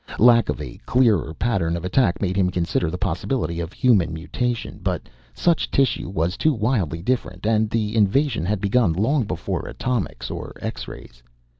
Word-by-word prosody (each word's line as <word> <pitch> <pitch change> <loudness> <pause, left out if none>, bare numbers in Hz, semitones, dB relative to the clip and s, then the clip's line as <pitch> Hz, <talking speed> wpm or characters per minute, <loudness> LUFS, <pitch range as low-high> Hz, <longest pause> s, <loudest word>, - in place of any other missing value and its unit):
Lack 115 -2 +5
of 75 - -1
a - - -7
clearer 120 -9 +3
pattern 95 -8 0
of 85 - -6
attack 95 0 +2
made 95 -1 0
him 95 -2 +2
consider 85 -1 0
the 90 - -4
possibility 90 - -2
of 85 0 -4
human 100 -11 +3
mutation, 115 +9 -3
but - - -1 0.3
such 170 - +1
tissue 135 -9 +1
was 90 -1 -1
too 155 - +3
wildly 105 - 0
different, 105 -5 -2
and 110 -1 +2
the 110 -1 -1
invasion 115 - +2
had 100 +3 0
begun 100 -2 +2
long 120 - +1
before 90 -4 -3
atomics 125 -6 -3
or - - -6
X - - -5
rays. - - -11
100 Hz, 170 wpm, -23 LUFS, 85-120 Hz, 0.3 s, Lack